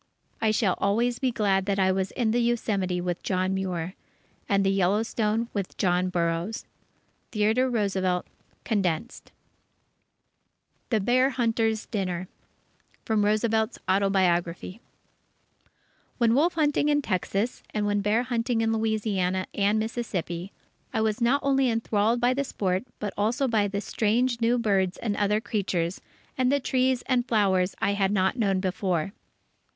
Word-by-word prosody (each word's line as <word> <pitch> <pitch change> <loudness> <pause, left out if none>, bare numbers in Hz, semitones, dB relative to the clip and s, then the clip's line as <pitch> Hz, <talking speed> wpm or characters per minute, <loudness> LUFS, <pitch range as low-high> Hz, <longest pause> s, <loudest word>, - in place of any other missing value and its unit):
I 220 - +3
shall 215 -3 +2
always 235 +4 +1
be 260 - +1
glad 200 -5 +1
that 200 -1 +1
I 190 -1 +3
was 190 0 -1
in 235 -4 0
the 240 - +2
Yosemite 205 -6 0
with 175 -1 -3
John 185 0 0
Muir, 185 -2 -3 0.6
and 200 0 +3
in - - +1
the 195 0 +2
Yellowstone 215 +4 +1
with 200 -3 -4
John 180 -1 +1
Burroughs. 170 +4 -2 0.7
Theodore 220 +4 +2
Roosevelt 190 -6 0 0.4
(Condensed) 200 0 -2 1.6
THE 220 - +2
BEAR 255 +5 +3
HUNTERS' 225 -3 0
DINNER 185 -4 -3 0.8
From 220 -2 +1
Roosevelt's 220 +2 +1
Autobiography 185 0 +1 1.4
When 235 -2 +3
wolf 320 +7 +2
hunting 295 -2 +2
in 290 -1 +2
Texas, 200 +3 -1
and 210 -1 -1
when 205 0 +1
bear 210 +4 +2
hunting 240 -1 -1
in 225 0 +1
Louisiana 205 -4 0
and 205 +1 +2
Mississippi, 200 -5 -3 0.4
I 220 - 0
was 220 +1 0
not 260 +4 +3
only 270 -2 +2
enthralled 225 0 +1
by 245 +1 +3
the 280 +2 -1
sport 190 -5 -2
but 205 -2 -4
also 235 +7 +1
by 215 -4 +2
the 200 0 -3
strange 235 +3 0
new 235 +2 +3
birds 195 -5 +1
and 210 -3 -2
other 210 +1 +1
creatures, 190 -6 -2 0.4
and 255 0 +3
the 285 - +3
trees 255 -1 +1
and 250 -2 0
flowers 195 -5 +2
I 200 - +1
had 195 -1 +1
not 190 -2 +1
known 200 -6 +1
before. 185 -2 -1
210 Hz, 145 wpm, -26 LUFS, 190-235 Hz, 1.6 s, I